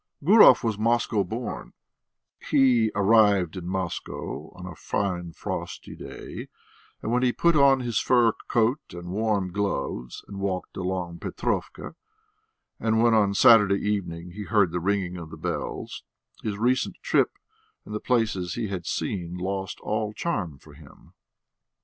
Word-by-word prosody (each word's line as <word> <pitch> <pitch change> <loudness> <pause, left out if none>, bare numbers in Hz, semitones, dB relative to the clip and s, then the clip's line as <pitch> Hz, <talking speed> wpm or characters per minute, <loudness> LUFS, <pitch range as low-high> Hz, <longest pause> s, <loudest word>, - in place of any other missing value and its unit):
Gurov 205 +1 +7
was 110 -3 -1
Moscow 115 -2 +1
born; 115 +6 -6 0.8
he 120 -5 +4
arrived 100 -4 +4
in 90 -2 -6
Moscow 95 -2 -4
on - - -9
a - - -7
fine 90 -4 -2
frosty - - -6
day, - - -8 0.6
and 110 - -2
when 125 +1 +2
he 125 -1 +3
put 170 +6 +2
on 140 -2 +5
his 120 -3 0
fur 120 -3 +4 0.2
coat 120 +4 +2
and 85 0 -8
warm 100 -2 0
gloves, 100 -11 -3
and 100 -1 -8
walked 95 -2 -3
along 90 -2 -3
Petrovka, - - -3 0.9
and 110 0 +2
when 120 -1 +4
on 100 -2 +3
Saturday 105 -4 +6
evening 90 -4 -3
he 105 +3 -7
heard 100 -6 +3
the 90 - -1
ringing 95 -1 -1
of 85 -2 -8
the - - -10
bells, - - -4 0.4
his 105 -2 -3
recent 125 +4 +1
trip - - +2 0.5
and 105 - -8
the 105 - -2
places 110 -8 0
he 115 -4 -3
had 90 -4 -5
seen 90 -2 -3
lost 95 +1 -4
all 105 0 -2
charm 100 - -3
for 75 +2 -17
him. 75 0 -17
100 Hz, 150 wpm, -26 LUFS, 90-115 Hz, 0.9 s, Gurov